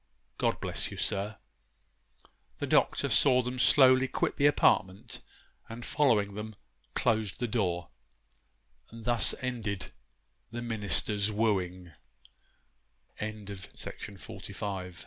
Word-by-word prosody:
God - - +1
bless - - -1
you, - - -9
sir!' 100 +2 -1 1.2
The - - -2
Doctor - - +2
saw 130 -2 +4
them 125 +1 -4
slowly 130 0 +6
quit - - -1
the 140 - +5
apartment, 95 -9 +2 0.5
and 115 +1 -7
following 115 -9 +2
them, 105 +1 -6 0.4
closed 110 -3 0
the 120 - -1
door, 90 -8 -1 1.0
and 115 -1 -11
thus 120 -1 +3
ended 110 -7 -3 0.6
THE 120 +1 -5
MINISTER'S 105 -2 0
WOOI 95 -5 -1
110 Hz, 95 wpm, -30 LUFS, 100-125 Hz, 1.2 s, slowly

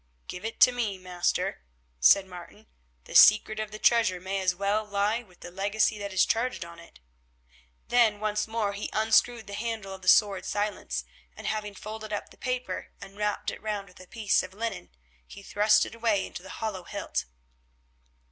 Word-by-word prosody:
"Give 180 - -7
it 225 +1 -5
to 250 - +8
me, 230 -6 -2
master," 180 -1 -2 0.4
said 190 - +6
Martin; 180 +4 -12 0.4
"the - - -12
secret 215 +1 +7
of 215 -1 -3
the 215 - -8
treasure 220 -5 +3
may 190 +2 -3
as 185 -1 +1
well 200 +3 0
lie 210 +2 0
with 185 -6 -22
the 175 - -9
legacy 205 +3 0
that 200 -1 -5
is 190 - +4
charged 235 -5 -1
on 170 0 -12
it." 170 - -16 0.9
Then 230 -4 +4
once 210 0 -1
more 220 -2 -1
he 200 +1 -5
unscrewed 220 +1 +2
the 200 - -9
handle 220 -3 -4
of 190 - -10
the 185 - -11
sword 200 -2 +5
Silence, 205 - -2 0.3
and - - -9
having 210 -2 -3
folded 215 +1 -8
up 205 - -4
the - - -17
paper 250 -1 -3
and 195 - -11
wrapped 210 0 -1
it - - -10
round 210 -2 -4
with 180 - -18
a 185 - -13
piece 220 -2 +1
of 185 +1 -10
linen, 210 - -4 0.4
he 200 - -12
thrust 210 +2 +3
it - - -9
away 225 -4 +1
into - - -8
the 190 - -12
hollow 200 -3 -4
hilt. - - -4
205 Hz, 190 wpm, -28 LUFS, 190-220 Hz, 0.9 s, to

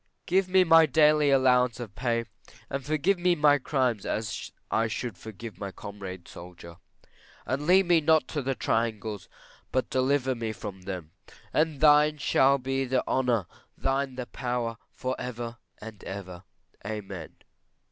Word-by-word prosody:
Give 185 +1 +2
me 185 0 +5
my 165 -2 +6
daily 150 -2 +4
allowance 125 -3 +3
of 115 -5 -7
pay; 115 0 -1 0.5
and 140 0 -3
forgive 155 +7 +1
me 175 0 +3
my 145 -2 +4
crimes 125 -6 0
as 110 -1 -3 0.2
I 115 0 +2
should 115 -1 -4
forgive 110 +4 -9
my 100 - -4
comrade 95 -2 -8
soldier. 85 -1 -11 0.7
And 135 +6 -2
lead 190 +2 +6
me 170 -2 +4
not 160 +1 +3
to 150 - -2
the 135 0 -2
triangles; 110 -4 -2 0.4
but 130 +1 -1
deliver 130 0 +1
me 115 -2 -4
from 100 -3 -8
them; 90 -4 -6 0.4
and 155 -2 +1
thine 150 0 +6
shall 140 -1 +3
be 135 +1 -1
the 130 0 0
honour, 125 -6 +1 0.3
thine 135 0 -1
the 125 -1 -4
power, 120 -2 -3
for 130 0 -3
ever 120 -1 -5 0.2
and 110 -2 -10
ever. 95 -2 -7 0.4
Amen. 105 -1 -6
125 Hz, 150 wpm, -27 LUFS, 110-145 Hz, 0.7 s, my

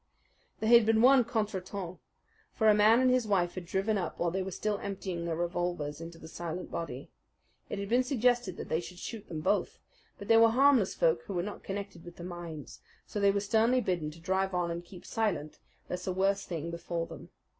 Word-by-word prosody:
There 220 - 0
had 235 -1 +8
been 225 0 +4
one 260 0 +7
contretemps; 200 -5 -3 0.6
for 220 - +2
a 215 - +8
man 215 +4 +5
and 255 -1 +4
his 250 -3 +2
wife 180 -4 +1
had 180 -2 -7
driven 195 +3 0
up 180 - -4
while 170 -1 0
they 190 +2 -1
were 190 - -3
still 205 +2 -2
emptying 190 -3 -4
their 165 -1 -1
revolvers 175 -3 -2
into 165 0 -8
the 160 - -11
silent 170 +2 -6
body. 145 -5 -5 0.6
It - - -3
had 200 0 -4
been 245 +4 +3
suggested 245 -6 +1
that - - -6
they 160 - 0
should 175 +1 -9
shoot 220 +3 -7
them 155 -2 -5
both; 195 +4 0 0.4
but 200 - -9
they 225 - +6
were 225 0 +7
harmless 255 -3 +4
folk 160 0 +2
who 200 - -5
were 175 - 0
not 205 +2 -6
connected 195 -3 -6
with 175 -1 -11
the 175 - -9
mines, 175 -4 -7 0.3
so 210 - -4
they 200 0 +4
were 200 0 +2
sternly 225 +5 +3
bidden 175 -9 -1
to 155 +2 -12
drive 190 +2 0
on 175 -1 0
and 170 +1 -4
keep 175 0 -13
silent, 205 -9 -2 0.3
lest 180 +1 -5
a - - +1
worse 195 +2 +1
thing 165 -1 -4
befall 170 0 -3
them. - - -11
190 Hz, 220 wpm, -30 LUFS, 170-215 Hz, 0.6 s, had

